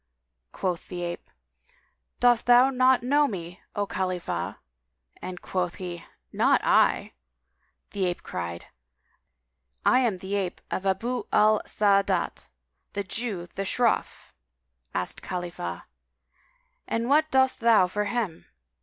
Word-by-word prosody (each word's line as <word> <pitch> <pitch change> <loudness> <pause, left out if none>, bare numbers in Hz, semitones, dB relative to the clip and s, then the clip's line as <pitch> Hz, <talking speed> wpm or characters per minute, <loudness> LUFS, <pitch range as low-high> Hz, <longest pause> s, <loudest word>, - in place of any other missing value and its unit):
Quoth 180 -3 -3
the 175 -1 -5
ape, 175 0 -5 0.9
"Dost 240 -1 +4
thou 245 +2 +7
not 255 -1 +4
know 290 +3 +3
me, 180 -6 -7
O 205 - 0
Khalifah!"; 185 -2 -3 0.7
and 180 -1 -7
quoth 180 -2 -2
he, 175 -2 -6 0.3
"Not - - +4
I!" - - +3 0.8
The 195 -2 -1
ape 175 -1 -2
cried, 85 -1 -5 1.2
"I 250 - +5
am 235 -7 +1
the 190 +2 -6
ape 195 -3 -2
of 195 - -2
Abu 235 +7 -1
al 215 0 +4
Sa'ádát 200 -1 +2
[FN#193] - - -17 0.5
the 200 - -2
Jew, 195 -2 -3
the 195 - -4
shroff." 235 +4 0 0.6
Asked 90 -1 -3
Khalifah, 175 -1 -5 1.0
"And 230 +1 -1
what 305 +3 +3
dost 265 -1 +3
thou 230 -5 +5
for 205 +3 -2
him?" 205 -6 -3
200 Hz, 125 wpm, -26 LUFS, 180-240 Hz, 1.2 s, thou